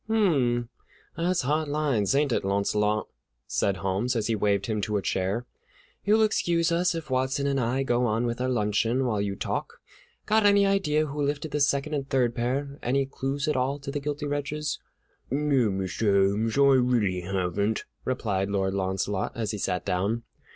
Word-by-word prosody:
"Hum, 135 - +2 0.5
that's 175 0 0
hard 150 +4 0
lines, 145 -7 +1
ain't 145 -1 +2
it, - - +1
Launcelot?" 105 +2 0 0.4
said 95 +10 0
Holmes, 100 +7 -1
as 110 -2 0
he 115 - +1
waved 100 -1 +1
him 110 -1 -1
to 105 +1 -1
a - - -1
chair; 95 +6 -1 0.6
"you'll 215 +2 +4
excuse 170 -6 +1
us 175 +1 +2
if 160 -4 -6
Watson 130 +2 0
and 140 -1 +1
I 125 +3 0
go 120 -1 +1
on 115 +2 0
with 120 +1 -2
our 130 - 0
luncheon 115 +2 +1
while 110 -5 0
you 100 -1 -2
talk. - - -3 0.5
Got 220 0 +3
any 200 -1 +5
idea 180 -6 +2
who 150 0 -4
lifted 145 +1 -2
the 150 - -1
second 145 +1 +1
and 140 -2 -2
third 125 -3 +2
pair, 140 +4 -2
any 135 +3 +1
clues 135 +2 -3
at 150 - +1
all 130 +2 0
to 140 -1 -6
the 145 - -2
guilty 145 +1 -3
wretches?" 145 +1 -2 0.5
"No, 140 -4 +2
Mr. 95 +1 +1
Holmes; 110 +4 -1
I 140 -2 +6
really 105 -8 +1
haven't," 95 +3 -1 0.2
replied 100 -6 -1
Lord 95 -1 0
Launcelot, 95 +1 -1
as 110 -3 -2
he 105 - -5
sat 90 -1 -2
down. 100 +6 0
125 Hz, 180 wpm, -27 LUFS, 105-145 Hz, 0.6 s, I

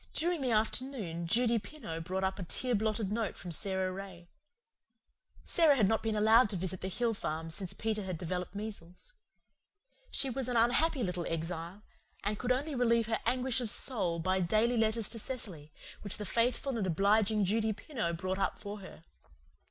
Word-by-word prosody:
During 340 -1 +1
the 260 - +1
afternoon 215 -6 -1
Judy 235 +4 +3
Pineau 205 - -7
brought 185 +3 -3
up 190 +1 -1
a - - -3
tear 250 +8 -1
blotted 215 -1 0
note 220 -2 -1
from 180 - -7
Sara 190 +1 0
Ray. 185 -2 -9 1.2
Sara 320 -4 +5
had 215 -7 +4
not 220 +2 +2
been 220 -1 -1
allowed 220 +2 +5
to 200 - -1
visit 185 0 -2
the 190 - -2
hill 230 +4 0
farm 160 -5 -4
since 185 +2 -2
Peter 220 -1 -1
had 185 -3 -4
developed 180 +2 -4
measles. 205 - -7 1.0
She 270 - 0
was 260 0 -2
an 245 -1 0
unhappy 250 +4 +3
little 180 -3 -2
exile, 165 +4 -4 0.4
and 205 +1 -1
could 250 0 0
only 285 +5 0
relieve 235 -3 +3
her 225 0 -1
anguish 255 +1 +1
of 235 - -1
soul 200 -9 +3
by 185 +3 +1
daily 215 +7 +2
letters 220 -1 +2
to 230 - -3
Cecily, 190 - -4 0.3
which 200 - -4
the 210 - -4
faithful 235 +4 +1
and 195 - 0
obliging 205 +4 +3
Judy 220 +3 +1
Pineau 210 - -3
brought 185 +3 -3
up 195 - 0
for 205 0 -7
her. 185 -4 -12
210 Hz, 180 wpm, -32 LUFS, 185-235 Hz, 1.2 s, Sara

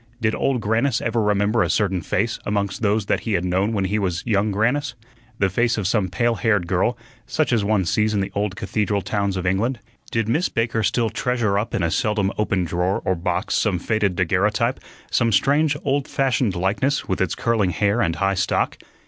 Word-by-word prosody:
Did 110 -2 +1
Old 130 -4 0
Grannis 115 +4 +1
ever 115 0 0
remember 105 +2 +2
a - - +1
certain 95 -4 +1
face 110 +6 -1
amongst 100 -1 -2
those 105 -1 +1
that - - +1
he 110 - -3
had 90 -2 0
known 95 +4 +1
when 100 -4 0
he 105 +3 0
was 90 -4 -2
young 105 -2 +1
Grannis 125 +6 0 0.4
the 95 - +2
face 115 +6 +1
of 105 - -2
some 95 0 +1
pale 120 +7 +1
haired 105 -3 +1
girl, 95 +7 0 0.3
such 135 +1 0
as 110 -3 +2
one 100 -2 +1
sees 105 +5 +1
in - - +1
the 95 - -2
old 100 -1 -1
cathedral 100 -1 -1
towns 100 0 -1
of 90 - -3
England? 105 +8 0 0.3
Did 115 -2 -1
Miss 155 +10 +1
Baker 115 -1 0
still 115 0 +1
treasure 115 -5 0
up 110 - -3
in 90 - 0
a 85 - +1
seldom 105 -4 0
opened 95 -4 0
drawer 90 +3 -1
or 95 - +2
box 85 0 -2
some 100 -3 +1
faded 100 0 0
daguerreotype, 105 +8 +1 0.3
some 115 -2 +2
strange 145 +8 +2
old 140 0 0
fashioned 125 -7 0
likeness, 105 +11 0
with 95 - -1
its 95 -3 0
curling 115 -5 +1
hair 100 +6 +1
and 85 -7 +1
high 95 0 +1
stock? 95 - 0
105 Hz, 205 wpm, -22 LUFS, 95-115 Hz, 0.4 s, remember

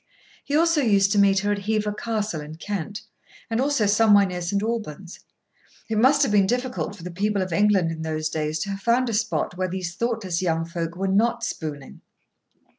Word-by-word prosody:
He 285 - -2
also 330 -1 +3
used 200 -5 +3
to 205 - +3
meet 195 -1 +4
her 205 0 0
at 200 -1 -3
Hever 215 -1 0
Castle 210 -6 -3
in 150 +1 -9
Kent, 205 +3 -5 0.5
and 225 +2 +1
also 280 -5 +1
somewhere 205 -1 +5
near 180 -2 -4
St. 200 +4 -1
Albans. 205 -6 -4 0.7
It 215 - +1
must 265 +5 +5
have - - +1
been 200 -2 +4
difficult 245 -3 -2
for 175 - -13
the 180 - -6
people 200 +2 0
of 185 -2 -5
England 195 -3 +3
in 160 -1 -6
those 155 -1 -2
days 155 0 -2
to 200 - -3
have 195 - -4
found 240 +3 +2
a - - -2
spot 215 -4 -1
where 185 - +1
these 180 -1 -4
thoughtless 220 -6 -2
young 165 -2 0
folk 170 0 -4
were 195 +2 -2
not 215 +5 +1
spooning. 145 -4 -6
200 Hz, 200 wpm, -24 LUFS, 175-220 Hz, 0.7 s, somewhere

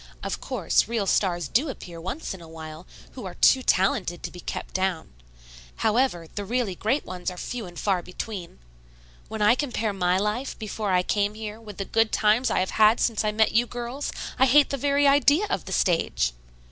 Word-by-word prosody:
Of - - -3
course - - +1
real 225 -3 -1
stars 175 -4 +1
do 275 - +1
appear 170 -9 -8
once 215 - -4
in 190 - -10
a 165 - -11
while, 160 +1 -9 0.2
who - - -9
are - - -8
too 260 - +5
talented 185 -5 +1
to - - -4
be 180 - -11
kept - - -6
down. 185 - -1 0.6
However, 220 -6 +1
the 205 - -6
really 230 -1 -1
great 225 +10 -1
ones 180 0 -4
are 180 - -9
few 230 +1 -5
and 175 -1 -12
far 190 -3 +1
between. 180 +1 -7 0.7
When 220 -1 -3
I 210 - +6
compare 240 -6 -1
my 180 -1 +1
life 210 +7 -2
before 215 -2 -3
I 180 -1 +3
came 205 +2 0
here 215 0 -7
with 210 -3 -10
the 195 - -3
good 225 +1 +2
times 220 +4 +3
I - - +1
have 185 - -2
had 215 +1 +5
since 225 -3 +1
I 215 - +1
met 220 +1 +2
you 240 +2 +3
girls, 245 +4 -4 0.3
I 265 - +6
hate 285 +3 +5
the - - 0
very 280 +1 +2
idea 285 +6 +4
of - - -1
the - - -7
stage. 165 - +1
210 Hz, 205 wpm, -25 LUFS, 180-240 Hz, 0.7 s, I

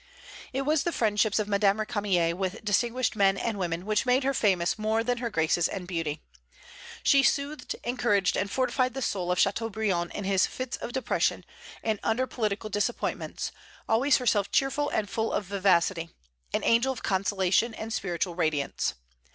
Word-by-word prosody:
It 270 +1 -1
was 300 +1 +2
the 345 - -1
friendships 215 -5 +1
of 215 -2 0
Madame 200 0 +3
Récamier 200 -6 0
with 185 +3 -4
distinguished 240 +4 +1
men 195 -2 +3
and 220 0 -2
women 175 0 -2
which 215 0 +1
made 255 +1 +2
her 275 +1 +1
famous 190 -5 +1
more 220 +1 +1
than 245 0 -1
her 235 -1 -2
graces 165 -3 +2
and 180 -2 -6
beauty. 165 -4 -3 0.8
She 275 - +5
soothed, 280 +2 0
encouraged, 230 -6 +1
and 200 - -1
fortified 255 +1 0
the 270 - -2
soul 180 -4 -1
of 180 - 0
Châteaubriand 200 -4 0
in 205 - -3
his 195 -1 +2
fits 255 -1 -4
of - - -6
depression 260 +1 0 0.4
and 220 -2 0
under 250 +4 +1
political 215 -3 -3
disappointments, 205 +4 -2 0.4
always 260 +5 +4
herself 215 -6 +1
cheerful 285 +2 +1
and 210 - -1
full 225 +2 -2
of 200 - -1
vivacity, 185 -3 +1 0.4
an - - -1
angel 235 +3 +3
of 260 - -7
consolation 195 +3 +1
and 220 0 -5
spiritual 175 -2 -2
radiance. 155 -5 -1
210 Hz, 165 wpm, -28 LUFS, 190-240 Hz, 0.8 s, She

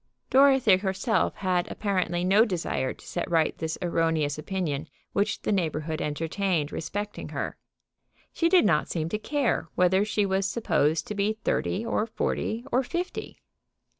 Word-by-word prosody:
Dorothy 265 -7 +6
herself 190 +3 0
had 180 -2 0
apparently 185 -4 -1
no 195 +4 +5
desire 170 - -1
to - - -13
set 175 - -3
right 165 -2 +2
this 160 0 -3
erroneous 165 -4 0
opinion 160 -4 -3 0.3
which 200 - 0
the - - 0
neighborhood 160 -4 -1
entertained 160 +1 -1
respecting 205 +5 -4
her. - - -4 0.8
She 335 - +2
did 360 -8 +5
not 160 -6 +2
seem 160 -2 -2
to 210 - -2
care 280 +2 0
whether 180 +2 +4
she 210 -1 0
was 190 0 +1
supposed 160 -8 +1
to - - -5
be 210 +2 0
thirty, 215 +4 0
or 225 -1 0
forty, 230 +1 -2
or 255 - +3
fifty. 345 +8 -4
190 Hz, 150 wpm, -27 LUFS, 165-215 Hz, 0.8 s, Dorothy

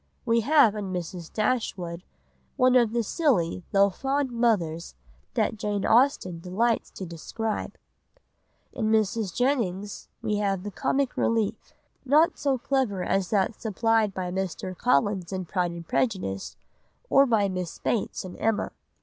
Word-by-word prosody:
We 230 -1 +3
have 265 -2 +5
in 205 -3 -4
Mrs. 175 -1 -5
Dashwood 200 -7 -1 0.6
one 255 0 +4
of 235 -3 +4
the 235 0 0
silly 200 - +1
though 200 0 +4
fond 270 +5 -1
mothers 185 - 0 0.4
that - - +1
Jane 205 -1 -2
Austen 225 -8 +3
delights 215 +7 0
to 190 - -7
describe. 210 +6 -4 1.0
In 220 - -2
Mrs. 215 -2 +1
Jennings 210 -7 -1
we 215 -2 0
have 195 -3 0
the 205 - -5
comic 270 +6 0
relief, 225 -1 0 0.3
not 300 +5 +3
so 275 -2 +1
clever 245 -7 0
as 190 -1 0
that 205 +1 0
supplied 225 0 +1
by 185 -2 -4
Mr. 185 0 -3
Collins 180 +4 +1
in 185 -1 -3
Pride 180 0 0
and 170 -1 -8
Prejudice 185 - -1 0.5
or 275 - +5
by 215 -4 +3
Miss 185 -3 -4
Bates 215 -4 -2
in 180 - -8
Emma. 225 -1 0
205 Hz, 140 wpm, -26 LUFS, 185-235 Hz, 1.0 s, have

